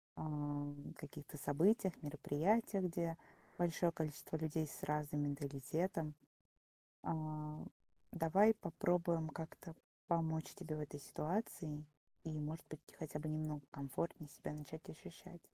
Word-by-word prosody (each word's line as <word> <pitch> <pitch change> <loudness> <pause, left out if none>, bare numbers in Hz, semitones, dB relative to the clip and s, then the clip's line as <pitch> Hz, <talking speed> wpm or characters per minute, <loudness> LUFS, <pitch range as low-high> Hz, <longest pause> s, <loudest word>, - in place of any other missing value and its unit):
ам, 145 -1 -2
каких-то 150 0 -7
событиях, 180 +7 +5
мероприятиях, 180 +7 +3
где 170 -1 0 0.4
большое 170 0 +4
количество 155 -1 -2
людей 160 0 +1
с - - -7
разным 150 0 +1
менталитетом. 145 +3 0 0.9
А, 155 -1 -1 0.5
давай 190 +6 +7
попробуем 170 -3 +2
как-то 160 0 -6 0.3
помочь 160 -2 +2
тебе 165 -5 -3
в 155 - -2
этой 145 -1 -4
ситуации 155 -1 -1 0.4
и, 160 - -2
может 150 +2 -2
быть, 155 - -6 0.2
хотя 150 -1 -3
бы 155 - -2
немного 155 -1 0
комфортнее 140 +3 -2
себя 145 - -5
начать 150 +1 -6
ощущать. 175 +2 -9
155 Hz, 115 wpm, -41 LUFS, 150-170 Hz, 0.9 s, давай